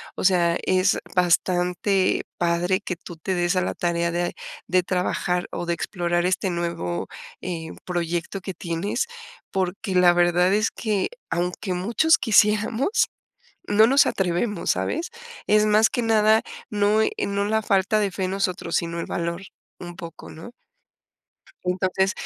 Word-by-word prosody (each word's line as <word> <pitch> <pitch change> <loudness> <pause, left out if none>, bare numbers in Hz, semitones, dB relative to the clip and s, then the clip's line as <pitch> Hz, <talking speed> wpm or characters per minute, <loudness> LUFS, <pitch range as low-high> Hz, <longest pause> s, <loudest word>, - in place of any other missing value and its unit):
O - - -5
sea, 175 -2 +3
es 185 +1 +3 0.2
bastante, 180 +2 +2
padre 175 +2 +1
que 180 - -4
tú 175 +1 -11
te 185 +4 -2
des 175 +1 +1
a 185 - +3
la - - -2
tarea 170 -1 0
de, 175 +1 -1 0.3
de 180 +1 +2
trabajar 180 0 -1
o - - -4
de 170 - +1
explorar 175 0 -1
este 185 +1 0
nuevo, 170 - -3 0.3
eh, 170 -3 -4 0.2
proyecto, 175 +1 -2
que 190 0 -5
tienes, 170 - -2 0.5
porque 190 +2 -2
la 180 -1 +6
verdad 175 +1 +3
es 215 +2 +2
que, 210 -4 -1 0.2
aunque 180 +2 -2
muchos 230 - +3
quisiéramos, 220 - +2 0.6
no 215 +2 +6
nos 275 +3 +5
atrevemos, 190 +3 -1
¿sabes? 340 +6 -2 0.4
Es 210 0 +4
más 215 +1 +5
que 245 - -2
nada, 220 -1 +4 0.3
no, 210 +1 +2
eh, - - +1 0.2
no 200 0 -1
la 220 +1 +1
falta 200 +2 +2
de 205 -2 0
fe 190 +1 -3
en 185 - -2
nosotros, 185 -3 -2
sino 170 0 -2
el 170 - -3
valor, 170 +1 -3 0.4
un 175 -1 -8
poco, 170 -3 -10
¿no? 165 +8 -10 1.1
Entonces, 185 +1 +1
185 Hz, 150 wpm, -24 LUFS, 175-205 Hz, 1.1 s, la